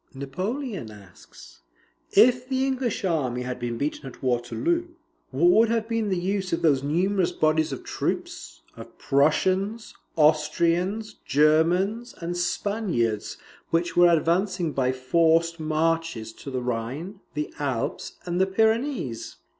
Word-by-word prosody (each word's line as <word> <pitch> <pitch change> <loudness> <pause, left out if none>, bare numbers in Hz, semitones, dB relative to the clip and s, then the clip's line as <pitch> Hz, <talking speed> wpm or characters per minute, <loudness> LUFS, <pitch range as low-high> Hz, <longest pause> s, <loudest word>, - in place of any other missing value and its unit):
Napoleon 185 - -4
asks, 100 -4 -15 0.5
"IF 250 +4 +5
THE 265 0 +1
ENGLISH 260 -6 -1
ARMY 130 -8 -1
HAD 125 0 -5
BEEN 120 -1 -3
BEATEN 145 +1 -3
AT 130 - -12
WATERLOO, 320 - 0 0.4
WHAT 155 +7 +3
WOULD 225 +4 +5
HAVE 225 -1 0
BEEN 225 -2 -1
THE 190 - 0
USE 190 +1 -2
OF 165 - -1
THOSE 145 -5 +4
NUMEROUS 180 +6 +1
BODIES 155 0 +1
OF - - -6
TROOPS, - - -4
OF - - -12
PRUSSIANS, 185 +10 +1 0.2
AUSTRIANS, 170 +7 +2
GERMANS, 175 - +2
AND 175 +1 -4
SPANIARDS, 175 - -1 0.3
WHICH 170 +1 0
WERE 175 0 +7
ADVANCING 175 +1 0
BY 130 -2 +1
FORCED 165 +5 +2
MARCHES 155 -7 -1
TO 140 - -9
THE 130 -2 -3
RHINE, 125 - -4 0.2
THE 150 0 -3
ALPS, 135 -5 -3
AND 175 +1 -1
THE 190 - +3
PYRENEES?" 220 - 0
170 Hz, 130 wpm, -25 LUFS, 140-205 Hz, 0.5 s, WERE